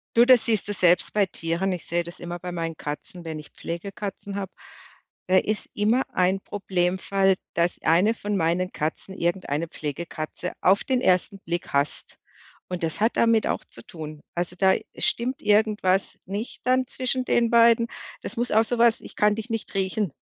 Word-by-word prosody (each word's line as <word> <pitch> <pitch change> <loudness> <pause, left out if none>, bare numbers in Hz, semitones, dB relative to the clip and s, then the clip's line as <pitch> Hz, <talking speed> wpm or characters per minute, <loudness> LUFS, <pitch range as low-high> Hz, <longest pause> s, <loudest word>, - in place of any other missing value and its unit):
Du, 235 +1 +7
das 250 -2 +6
siehst 220 -4 +1
du 205 - -1
selbst 180 -2 +3
bei 205 -1 +3
Tieren. 170 +1 -2
Ich 180 - -4
sehe 170 0 0
das 170 +1 -10
immer 175 0 -6
bei 180 +1 -6
meinen 165 -2 -3
Katzen, 150 +4 -6
wenn 160 -1 -5
ich 150 - -12
Pflegekatzen 195 +3 -6
habe, 195 -2 -4 0.8
da 185 - +4
ist 215 +2 0
immer 220 +5 +2
ein 185 +1 +2
Problemfall, 190 0 +1 0.2
dass 170 +1 0
eine 185 +7 +4
von 205 -2 -3
meinen 180 +2 +1
Katzen 155 +5 -4
irgendeine 170 -3 -1
Pflegekatze 155 +3 -5
auf 195 +2 +4
den 255 -2 +1
1. 185 0 +2
Blick 175 -1 -4
hasst 140 +1 -1 0.5
und 180 -1 -2
das 160 +3 -1
hat 225 +2 +2
damit 230 -1 +4
auch - - -1
zu - - -10
tun. 155 -2 -8
Also 175 +1 -2
da 190 0 +5 0.2
stimmt 250 +3 +1
irgendwas 210 -2 +2
nicht 205 +5 -6
dann 255 0 +2
zwischen 255 0 -1
den 235 -2 +2
beiden. 230 0 +5 0.3
Das - - -6
muss 240 +1 0
auch 220 +1 +5
so 240 +2 0
was 235 -1 +4
ich - - -11
kann 210 0 +4
dich 220 +2 -6
nicht 225 -2 -4
riechen, 190 -3 0
190 Hz, 180 wpm, -25 LUFS, 170-220 Hz, 0.8 s, Du